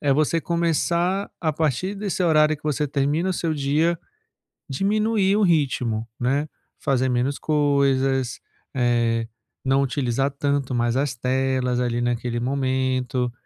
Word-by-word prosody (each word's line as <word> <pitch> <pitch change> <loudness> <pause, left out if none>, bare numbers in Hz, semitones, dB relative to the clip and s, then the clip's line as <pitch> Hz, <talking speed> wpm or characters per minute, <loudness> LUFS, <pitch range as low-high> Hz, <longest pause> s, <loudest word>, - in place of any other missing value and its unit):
é 140 -2 +2
você 155 +3 +2
começar, 170 +3 0
a 160 -3 0
partir 155 +5 -1
desse 195 -2 -2
horário 155 -2 +4
que - - -28
você 150 0 0
termina 145 +6 0
o - - +1
seu 165 -2 -1
dia, 150 +4 +1 0.7
diminuir 205 +5 +1
o 215 - +2
ritmo, 130 - +1
né, 140 +5 0 0.3
fazer 130 -2 +1
menos 125 +3 0
coisas, 135 -4 +1 0.3
eh, 120 -2 +1 0.4
não 135 +1 +3
utilizar 135 0 0
tanto 140 -1 -1
mais 120 0 +1
as 135 -1 0
telas 130 0 0
ali, 120 -1 0
naquele 120 0 -1
momento, 130 -1 -1
140 Hz, 135 wpm, -23 LUFS, 125-155 Hz, 0.7 s, horário